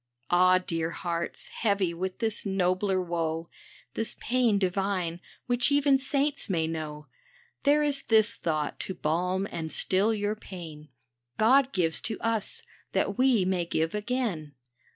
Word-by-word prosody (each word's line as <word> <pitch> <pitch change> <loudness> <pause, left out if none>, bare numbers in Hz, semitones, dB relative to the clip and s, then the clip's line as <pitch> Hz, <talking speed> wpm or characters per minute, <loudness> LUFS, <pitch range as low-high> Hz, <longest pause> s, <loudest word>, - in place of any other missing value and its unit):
Ah! 185 +1 +6
dear 165 -3 -2
hearts, 170 0 -4
heavy 200 -5 0
with 185 +2 -4
this 225 -2 -1
nobler 190 0 +1
woe, 165 -2 -2 0.4
This 225 - -2
pain 240 -4 +2
divine, 185 -3 -1 0.3
which 245 +1 +1
even 285 -1 +4
saints 280 -1 -1
may 165 -4 +1
know, 155 -2 -5 0.6
There 295 +1 +5
is 285 -2 +1
this 220 0 +4
thought 155 -3 -2
to 190 - -4
balm 180 +5 0
and 160 -1 -4
still 195 +4 +2
your 210 -1 -1
pain: 165 -7 -10 0.2
" 120 0 -57
God 260 +4 +5
gives 165 - +1
to 220 - -4
us 225 -2 -2 0.3
that - - 0
we 250 -7 +4
may 185 -2 +1
give 165 -1 -1
again." 210 - -2
190 Hz, 145 wpm, -28 LUFS, 170-225 Hz, 0.6 s, Ah